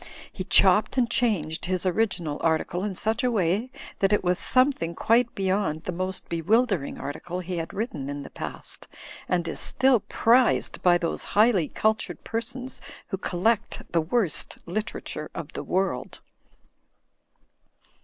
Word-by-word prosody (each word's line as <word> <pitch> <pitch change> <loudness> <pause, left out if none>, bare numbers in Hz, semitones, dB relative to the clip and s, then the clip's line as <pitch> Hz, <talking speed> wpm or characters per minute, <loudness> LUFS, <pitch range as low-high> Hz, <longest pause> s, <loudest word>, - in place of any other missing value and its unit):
He - - -4
chopped - - +4
and 245 -2 +3
changed 175 -11 0
his 185 0 -1
original 180 -6 0
article 165 +2 0
in 205 -2 -3
such 220 +7 -1
a 250 - +3
way 205 +2 +1 0.3
that 195 0 +2
it 205 - +2
was 180 0 +1
something 255 -11 +2
quite 235 +2 +2
beyond 190 -5 0
the 180 - -3
most 185 +2 -4
bewilder 195 - +2
ing - - -6
article 155 +6 -5
he 180 0 -4
had 165 0 -4
written 195 - -4
in 145 0 -5
the - - -11
past; - - -5 0.4
and 175 -2 +1
is - - -4
still 265 -3 +4
prized 240 +5 +2
by 175 -1 +5
those 170 -2 -2
highly 210 -7 +5
cultured 220 0 -1
persons 245 +3 -2 0.3
who 190 - -2
collect 200 +6 0
the 170 - +2
worst 185 +1 0
literature 215 +6 -4
of - - -6
the - - -4
world. 185 -9 -2
190 Hz, 150 wpm, -26 LUFS, 170-225 Hz, 0.4 s, by